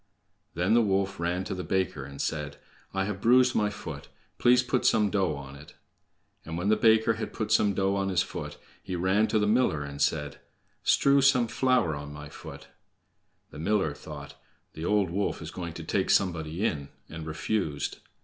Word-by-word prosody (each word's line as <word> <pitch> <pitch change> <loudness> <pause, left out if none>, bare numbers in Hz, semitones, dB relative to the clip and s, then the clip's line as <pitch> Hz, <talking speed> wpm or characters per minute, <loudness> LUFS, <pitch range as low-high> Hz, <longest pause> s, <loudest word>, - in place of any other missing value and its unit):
Then 90 +5 +2
the 120 - +6
wolf 95 -3 0
ran 85 +2 -1
to 100 - -4
a - - -3
baker 90 -8 -1
and 70 0 -10
said: 75 -2 -3 0.3
"I 95 0 -1
have 100 -1 -4
bruised 125 +2 +5
my 105 -1 +2
foot; 80 -8 -8 0.3
please 125 +1 +5
put 125 0 0
some 105 -3 +3
dough 95 -7 +1
on 70 -1 -9
it." 75 +2 -14 0.7
And 80 +1 -5
when 90 +4 -1
the 110 - +5
baker 110 0 +4
had 110 0 -5
put 110 -1 -3
some 105 -2 +3
dough 95 0 +1
on 95 -1 0
his 90 -2 +2
foot, - - -7 0.2
he 95 - -5
ran 95 +5 +2
to 110 - +1
the 105 - +2
miller 105 - +2
and 70 0 -7
said: 75 0 0 0.4
"Strew 140 0 +4
some 130 -3 +4
flour 125 - +1
on 75 0 -7
my 75 0 -9
foot." - - -11 0.8
The - - -10
miller 95 -3 +1
thought, - - -9 0.4
"The 80 - -6
old 100 -3 +2
wolf 100 +3 -1
is 80 -1 -7
going 85 -3 -6
to 80 - -7
take 95 +4 -1
somebody 85 0 +1
in," 70 -8 -2 0.2
and 80 0 -8
refused. 80 -1 -2
95 Hz, 190 wpm, -28 LUFS, 80-110 Hz, 0.8 s, the